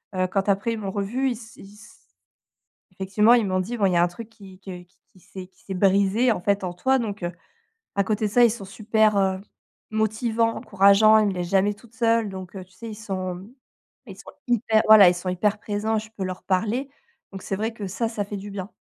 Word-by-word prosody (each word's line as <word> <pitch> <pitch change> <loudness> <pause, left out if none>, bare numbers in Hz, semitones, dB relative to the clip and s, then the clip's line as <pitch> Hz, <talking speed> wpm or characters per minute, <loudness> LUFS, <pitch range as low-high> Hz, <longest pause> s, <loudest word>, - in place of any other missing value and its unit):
Heu, 185 0 +1
quand, 195 +2 -2
après, 200 +4 +1
ils - - -4
m'ont 195 -2 -4
revu, 215 +7 -1
ils - - -1
s 225 -1 -13
ils 195 +1 -14
s 210 +1 -17 1.0
effectivement, 195 +4 +3
ils 235 -3 +3
m'ont 185 -1 0
dit: 205 +6 -3
«Bon, 205 - +1
il 185 - 0
y - - +1
a 170 - +4
un - - +3
truc 215 +6 -10
qui 195 -4 -15
que 185 -2 -9
qui 180 +2 -32
qui 185 - -22
s'est 185 +1 -11
qui 190 - -30
s'est 195 - -6
brisé, 200 +5 +2
en 220 - -1
fait, 200 +1 0
en 180 - -3
toi». 260 +9 +1
Donc, 210 -5 -5
heu, 175 - -2 0.7
à 200 - +2
côté 215 +1 -1
de - - -3
ça, 240 +3 +5
ils 235 - +5
sont 215 -2 -6
super, 215 +1 +1
heu, 190 -1 +1 0.5
motivants, 220 +1 0
encourageants. 200 +2 +5
Ils 215 - +3
me - - -1
laissent 180 -1 -4
jamais 195 +2 +2
toute 225 +2 -20
seule. 230 -1 +1
Donc, 190 -2 -9
heu, 190 - -7
tu 185 - -29
sais, 230 +5 -10
ils - - -7
sont 190 -3 -5 0.6
ils 195 -4 -10
sont - - -12 0.2
hyper, 220 -2 +2
voilà, 215 -3 +9
ils 175 - +2
sont 175 +1 -6
hyper 205 +4 0
présents, 215 +1 -2
je 215 +1 -7
peux 195 - -5
leur 185 0 -6
parler. 220 +8 -1 0.4
Donc, 195 -1 -8
c'est 195 - -3
vrai 220 +3 -2
que 210 -3 -6
ça, 225 +4 -2
ça 220 -3 -3
fait 205 +1 -7
du 200 +1 -8
bien. 195 0 -6
205 Hz, 245 wpm, -24 LUFS, 190-220 Hz, 1.0 s, voilà